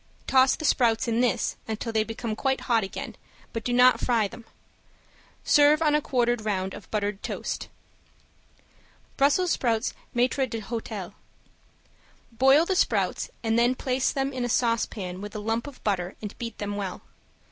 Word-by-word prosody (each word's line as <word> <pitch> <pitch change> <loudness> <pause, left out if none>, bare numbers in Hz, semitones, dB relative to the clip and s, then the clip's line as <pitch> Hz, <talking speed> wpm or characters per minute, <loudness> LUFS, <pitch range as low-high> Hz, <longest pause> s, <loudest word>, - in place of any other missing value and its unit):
Toss 260 0 +4
the 315 - -6
sprouts 230 -4 +2
in 230 +1 +1
this 245 -6 0
until 225 +1 -4
they 220 -1 +3
become 225 0 -4
quite 265 +3 0
hot 230 -4 +2
again, 195 - -6 0.4
but 230 -2 -4
do 245 - -2
not 250 +1 +5
fry 230 -4 +2
them. 230 +3 -12 1.0
Serve 295 +1 +5
on 305 -2 +2
a 300 - +3
quartered 240 -4 +1
round 190 -3 -1
of 205 - -11
buttered 205 -1 -2
toast. - - -4 1.5
~BRUSSELS 310 +6 +3
SPROUTS 230 -1 0 0.2
MAITRE 255 +2 +2
D'HOTEL~ 220 -4 -5 1.2
Boil 270 +7 +5
the 380 - 0
sprouts - - +1
and 225 0 +2
then 240 +2 +3
place 255 0 0
them 270 0 -2
in 255 -1 -2
a 245 - -1
saucepan 225 -6 -1
with 205 +1 -8
a - - -3
lump 225 +4 -2
of 285 - -11
butter 190 -3 -1
and 210 -2 -7
beat 230 -2 -5
them 205 0 -4
well. 195 -3 -5
235 Hz, 160 wpm, -26 LUFS, 215-260 Hz, 1.5 s, not